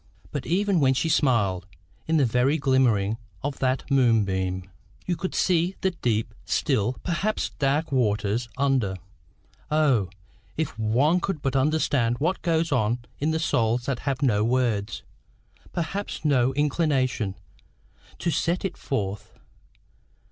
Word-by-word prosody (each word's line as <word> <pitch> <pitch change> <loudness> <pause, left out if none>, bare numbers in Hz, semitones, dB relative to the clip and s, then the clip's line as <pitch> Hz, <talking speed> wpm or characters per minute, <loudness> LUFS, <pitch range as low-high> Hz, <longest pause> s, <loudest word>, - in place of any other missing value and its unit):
But 145 -3 -4
even 195 +1 +2
when 135 -2 +3
she 140 +6 0
smiled, 100 - +2 0.4
in 160 0 +2
the 140 - +4
very 125 +6 +2
glimmering 125 -7 +2 0.3
of 145 -1 -3
that 130 0 +1
moonbeam, 95 -8 +2 0.4
you 180 - 0
could 185 +2 -4
see 180 +1 +2
the 190 - +2
deep, 115 -10 -1
still, 110 +4 0
perhaps 190 +5 -1
dark, 145 +3 +1
waters 115 -2 0
under. 130 -8 +1 0.7
O! 140 - +2 0.5
if 160 -2 -2
one 130 +11 +3
could 180 -4 -3
but 135 -1 -1
understand 135 -4 +2
what 170 +8 -1
goes 165 -2 +1
on 120 -3 +2 0.2
in 150 - 0
the 160 - +1
souls 120 -7 +1
that 130 -3 -2
have 140 0 -2
no 105 -6 +3
words, 115 -4 0 0.7
perhaps 175 +1 -4
no 130 -3 +3
inclination, 135 - 0 0.8
to 170 - -1
set 175 +4 0
it 190 - -3
forth! 100 -6 -4
135 Hz, 135 wpm, -25 LUFS, 115-160 Hz, 0.8 s, the